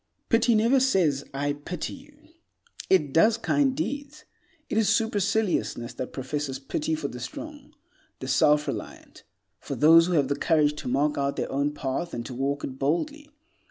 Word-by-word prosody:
Pity 230 0 +4
never 230 +5 +4
says 180 - +2
"I 145 +1 -1
pity 150 +4 -6
you"; 285 +2 -14 0.7
it 150 -8 +3
does 215 +7 +4
kind 270 +3 +1
deeds. 290 0 -4 0.4
It 220 - 0
is 210 -4 +2
superciliousness 210 - 0
that 130 - -6
professes 135 0 -4
pity 150 +3 -2
for 155 -2 -3
the 125 - -8
strong, 290 - -9 0.4
the 130 - -7
self 150 +3 +3
reliant, - - -7 0.4
for - - -5
those 165 +2 +6
who 180 - -1
have 145 -5 +3
the 140 - 0
courage 150 0 +2
to - - -6
mark 145 +4 +1
out 140 0 0
their - - -3
own 145 +2 -1
path 145 +5 -3
and 120 0 -5
to 130 - -7
walk 140 +3 -2
it 130 0 -6
boldly. 290 - -1
155 Hz, 170 wpm, -26 LUFS, 140-225 Hz, 0.7 s, those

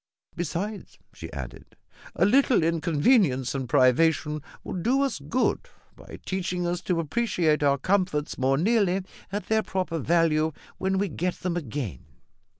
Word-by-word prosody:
"Besides," 180 +5 -4 0.2
she - - -9
added, - - -8 0.4
"a - - +3
little 250 - +4
inconvenience 160 - +2
and 130 -3 -4
privation 150 +4 +3 0.2
will - - -6
do 245 +10 +1
us 275 - -1
good 255 - -1 0.3
by - - -11
teaching 180 -1 -2
us 175 +1 -1
to 180 -2 -1
appreciate 165 -3 +1
our 140 -1 +3
comforts 180 -2 0
more 135 +1 +1
nearly 195 0 +2 0.3
at 205 +1 -3
their 220 0 +2
proper 185 -5 -2
value 160 0 +2 0.3
when 190 0 0
we 200 +1 +1
get 180 +2 -2
them 180 -2 -3
again." 130 - -4
175 Hz, 145 wpm, -26 LUFS, 150-195 Hz, 0.4 s, little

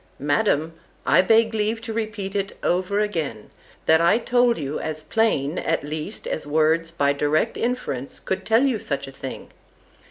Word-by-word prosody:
—Madam, 150 +2 +1 0.3
I 175 - +5
beg 225 +3 +4
leave 220 +1 0
to 225 -1 -5
repeat 215 -3 -4
it 200 0 -2
over 185 +3 +1
again, 160 - -3 0.3
that 160 +1 +5
I 170 +5 +5
told 245 0 +2
you 145 -1 -3
as 155 -1 -4
plain, 180 -9 +1
at 165 -1 -1
least, 155 +7 -5
as 155 - -3
words, 160 +2 +2
by 140 -4 +1
direct 150 +9 +1
inference, 230 - -3
could 190 - -3
tell 225 +3 +3
you 260 -6 +1
such 140 -5 -3
a - - -8
thing. 135 -1 -8
170 Hz, 165 wpm, -23 LUFS, 150-220 Hz, 0.3 s, I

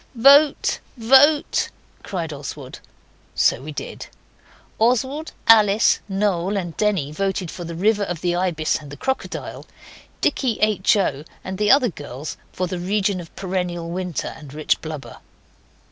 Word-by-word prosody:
'Vote! 280 +5 +5 0.2
vote!' 270 +6 +4 0.3
cried 170 -6 -4
Oswald. 140 -1 -8 0.6
So - - +2
we 150 +3 -7
did. 145 - -7 0.7
Oswald, 260 +7 +1
Alice, 215 -2 +5
Noel, 195 -1 0
and 175 -4 -4
Denny 195 -9 0
voted 190 0 -2
for 175 - -7
the 170 0 -6
river 210 +4 +2
of 175 -4 -3
the 175 -1 0
ibis 175 -4 0
and 150 -2 -12
the 145 - -9
crocodile. 265 0 -4 0.5
Dicky, 245 -5 0
H. 215 -1 +3
O., 145 -8 -1 0.2
and 190 +1 -6
the 210 0 +2
other 265 -3 +5
girls 145 -3 -7 0.2
for 185 - -2
the 180 0 -4
region 195 +1 0
of 165 - -14
perennial 180 -3 -3
winter 180 -4 -3
and 145 -2 -12
rich 155 -1 0
blubber. 155 -3 -7
185 Hz, 145 wpm, -22 LUFS, 165-215 Hz, 0.7 s, Vote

